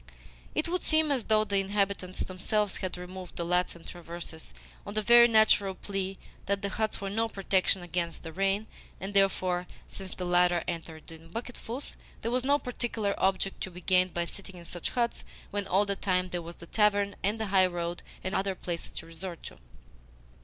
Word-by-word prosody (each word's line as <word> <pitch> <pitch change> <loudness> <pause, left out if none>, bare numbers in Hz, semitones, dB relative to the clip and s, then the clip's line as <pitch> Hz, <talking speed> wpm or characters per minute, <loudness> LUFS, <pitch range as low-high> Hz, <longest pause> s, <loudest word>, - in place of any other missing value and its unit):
It - - +3
would 360 +1 0
seem 315 -1 +3
as 260 -5 0
though 215 -1 +4
the 200 -2 +1
inhabitants 195 -1 -1
themselves 195 +2 0
had 185 -1 -3
removed 180 0 -8
the 170 - -2
laths 180 +1 +1
and 170 - -14
traverses, 170 -2 -8 0.3
on 205 - -7
the 215 - +1
very 235 +1 +9
natural 215 -4 +5
plea 195 0 -3 0.3
that 200 +1 0
the 200 - 0
huts 215 +2 -1
were 195 - -3
no 225 +2 +1
protection 190 -2 +2
against 170 -1 -2
the 165 -1 -7
rain, 195 +3 +1 0.3
and 195 +2 -5
therefore, 185 -2 +3 0.2
since 190 -2 -9
the 180 - -4
latter 175 -1 +4
entered 165 -2 -5
in 165 0 -11
bucketfuls, 240 +5 -5 0.3
there 230 - 0
was 250 0 +1
no 285 +2 +4
particular 235 -6 -1
object 195 0 +1
to - - -2
be 180 0 -10
gained 185 0 +4
by 170 0 -1
sitting 195 +1 -8
in 170 - -11
such 175 0 -3
huts 240 -2 0 0.3
when 205 -1 -1
all 200 +2 +3
the 200 0 +1
time 185 -2 0
there 175 -1 -2
was 170 +1 -8
the 170 - -11
tavern 205 +1 +2
and 210 +3 +1
the 220 - 0
highroad 175 -2 +2 0.2
and 185 - -2
other 195 -1 +1
places 170 -2 -4
to - - -8
resort 165 +1 -7
to. - - -9
190 Hz, 195 wpm, -30 LUFS, 175-210 Hz, 0.3 s, very